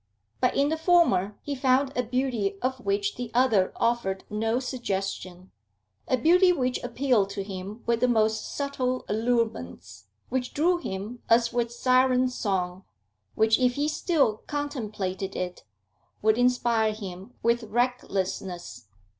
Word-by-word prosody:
But - - +2
in 280 +1 +3
the 320 - 0
former 320 - +3
he 290 - -3
found 265 +1 +2
a 250 - +2
beauty 240 -5 -1
of 260 0 -1
which 400 +5 -1
the 245 -2 -4
other 225 -7 +3
offered 230 -5 0
no 225 +3 0
suggestion, 195 -7 -4 0.6
a 255 - +2
beauty 360 +8 +5
which 255 -7 -1
appealed 245 -4 +1
to 200 0 -4
him 195 +3 -7
with 235 -1 +1
the 250 - +3
most 220 -2 +1
subtle 260 -3 -2
allurements, 155 - -2 0.2
which 250 0 -2
drew 345 +4 +2
him 210 - -6
as 230 +1 +4
with 235 -1 0
siren 255 +1 +3
song, 190 -6 -2 0.5
which, 220 +2 +3
if 250 -1 +3
he 290 +1 0
still 305 - +1
contemplated 210 -10 -3
it, 180 0 -4 0.6
would 220 0 +4
inspire 235 -3 +2
him 195 +2 -9
with 235 +1 +2
recklessness. 195 - -2
235 Hz, 140 wpm, -26 LUFS, 200-255 Hz, 0.6 s, beauty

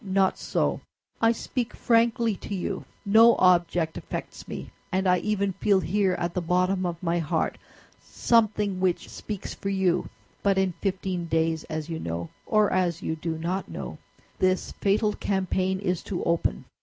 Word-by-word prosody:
"Not 190 -1 +1
so; - - 0 0.4
I 225 0 +5
speak 235 +1 -3
frankly 230 -1 +2
to 200 - -5
you. 185 - -3 0.2
No 225 +3 +7
object 175 -2 +3
affects - - -7
me; - - -7 0.2
and 190 0 +1
I 180 0 +4
even 200 -1 0
feel 195 +1 +3
here, 190 +2 +1
at 175 -1 -2
the 180 - -1
bottom 180 +2 +1
of 170 0 -5
my 170 0 +1
heart, 155 -3 -1 0.4
something 210 -4 +1
which 185 -2 0
speaks 205 -3 -6
for 195 - -4
you. 190 -3 +1 0.3
But 195 -1 +2
in 190 -1 +2
fifteen 185 -3 -2
days, 160 0 0
as 155 -1 -4
you 165 -1 -4
know, 85 0 -4 0.2
or 215 -1 +3
as 175 -3 0
you 160 - -1
do 160 0 -3
not 180 +4 -2
know, - - -6 0.4
this 185 0 +1
fatal 210 +1 +1
campaign 190 -1 0
is 180 -3 -1
to 190 - -3
open. 165 - 0
185 Hz, 165 wpm, -26 LUFS, 170-200 Hz, 0.4 s, No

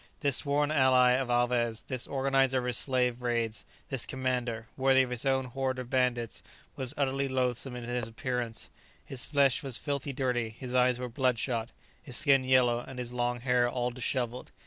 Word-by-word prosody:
This 140 -3 +3
sworn 145 0 0
ally 130 -3 +5
of 125 0 0
Alvez, 120 -2 +1
this 130 -2 -4
organizer 135 -1 +2
of 125 - -1
his 125 -1 +1
slave 125 -2 +1
raids, 115 -2 -1 0.2
this 135 -4 -1
commander, 125 -3 -2
worthy 130 0 +4
of 125 - -5
his 125 +2 -2
own 135 -1 +2
horde 130 +1 -2
of 125 -1 -7
bandits, 125 -3 0 0.3
was 130 +2 -5
utterly 140 -1 0
loathsome 130 -1 -1
in 120 - -6
his 120 -1 -3
appearance, 115 0 -3 0.4
his 130 -2 -4
flesh 140 -2 +3
was 135 -5 -1
filthily 140 -1 -3
dirty, 125 -3 -1
his 125 +3 -8
eyes 125 -1 +3
were 125 0 -4
bloodshot, 120 -2 -1 0.3
his 125 -3 -3
skin 140 -3 +5
yellow, 125 -2 +3
and 130 +1 -9
his 125 -1 -4
long 120 0 -1
hair 125 -1 +2
all 125 0 -1
dishevelled. 125 0 -3
125 Hz, 180 wpm, -29 LUFS, 120-130 Hz, 0.4 s, ally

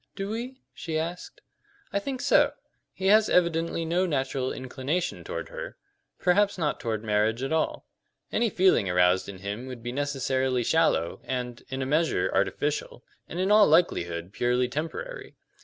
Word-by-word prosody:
"Do 195 0 -4
we?" 250 +4 -5
she 160 -2 -4
asked. 170 +3 -5 0.5
"I 200 - +2
think 260 +4 -4
so. - - +4 0.4
He 190 - -6
has 215 +2 +5
evidently 165 -1 +1
no 175 +3 +1
natural 135 -3 -1
inclination 135 +7 -3
toward - - -5
her - - -7 0.4
perhaps 200 +3 +2
not 155 -4 -1
toward 110 -2 -3
marriage 110 +3 +1
at 135 - -1
all. 160 - -1 0.5
Any 235 - +2
feeling 185 - +3
aroused 90 +1 +3
in 100 - -7
him 100 +6 -5
would 125 -3 -8
be 120 - -3
necessarily 130 -2 0
shallow 160 - +1
and, 125 -2 -4
in 130 0 -3
a - - -3
measure, 155 +5 +1
artificial, - - -1 0.3
and 175 - -5
in 190 +2 +1
all 210 -1 +7
likelihood 90 - +1
purely 125 +1 +1
temporary. 165 - -5
150 Hz, 155 wpm, -27 LUFS, 125-185 Hz, 0.5 s, all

